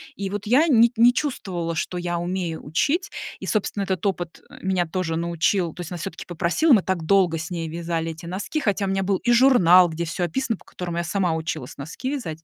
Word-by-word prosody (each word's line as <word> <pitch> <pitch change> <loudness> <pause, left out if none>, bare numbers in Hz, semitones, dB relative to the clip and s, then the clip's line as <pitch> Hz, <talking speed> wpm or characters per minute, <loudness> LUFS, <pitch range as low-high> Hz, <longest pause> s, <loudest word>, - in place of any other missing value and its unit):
И 195 -1 -4
вот 205 +1 -4
я 260 +10 +4
не 235 -5 +5
не 240 +2 +6
чувствовала, 190 - -3
что 175 +2 -3
я 175 -1 -2
умею 175 -2 -3
учить. 295 - 0 0.3
И, - - -7
собственно, 205 -1 -1
этот 190 -2 -2
опыт 175 -4 -2 0.2
меня 185 -2 0
тоже 165 -1 -2
научил. 170 +1 0
То - - -8
есть 175 - -7
она 175 - -4
всё-таки 165 0 -6
попросила, 180 - +2
мы 215 - +6
так 185 -3 -1
долго 180 -2 +3
с 160 +2 -5
ней 165 -2 -3
вязали 165 0 -3
эти 165 +1 -10
носки, 195 - -3
хотя 205 -6 0
у - - -2
меня 195 0 0
был 195 0 +1
и 240 - 0
журнал, 210 -9 +6
где 165 +1 -3
всё 170 +3 -3
описано, 225 +6 -1
по - - -21
которому 175 -2 -6
я 170 - 0
сама 175 -1 0
училась 155 -4 -5
носки 160 - -5
вязать. 165 - -5
180 Hz, 220 wpm, -23 LUFS, 165-205 Hz, 0.3 s, не